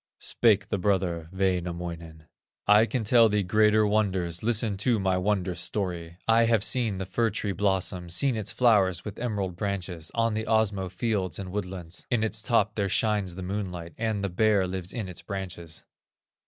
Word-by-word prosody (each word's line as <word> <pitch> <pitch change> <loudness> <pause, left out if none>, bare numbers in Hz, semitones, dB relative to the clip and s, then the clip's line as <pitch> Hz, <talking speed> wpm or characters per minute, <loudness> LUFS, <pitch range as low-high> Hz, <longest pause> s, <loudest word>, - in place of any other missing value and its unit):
Spake 105 -4 +2
the 100 - -1
brother, 90 -4 0
Wainamoinen: 85 -4 -3 0.4
"I 105 +2 +6
can 115 +2 -2
tell 115 +1 +5
thee 105 -1 +1
greater 105 +3 +3
wonders, 95 -5 0
Listen 110 -2 0
to 115 +2 +1
my 95 -1 +1
wondrous 90 -1 -1
story: 85 -4 -4
I 115 +1 +5
have 115 -3 +3
seen 115 -6 +1
the 95 - -3
fir 115 +5 0
tree 105 -1 -2
blossom, 95 -2 -1
Seen 125 +9 +2
its 110 -3 -2
flowers 100 -8 +3
with 105 -2 -7
emerald 100 -7 -2
branches, 90 -4 -4
On 115 -1 +1
the 110 +1 -2
Osmo 105 -4 +1
fields 95 -4 -1
and 95 -2 -6
woodlands; 90 -4 -5
In 120 -3 +1
its 110 0 0
top, 105 -1 +2
there 100 -2 -1
shines 105 -4 0
the 95 - -6
moonlight, 90 -3 -5
And 110 -3 -2
the 100 - -1
Bear 100 +1 +2
lives 90 -1 -5
in 110 -5 -4
its 90 - -7
branches." 90 -4 -6
100 Hz, 175 wpm, -27 LUFS, 90-110 Hz, 0.4 s, I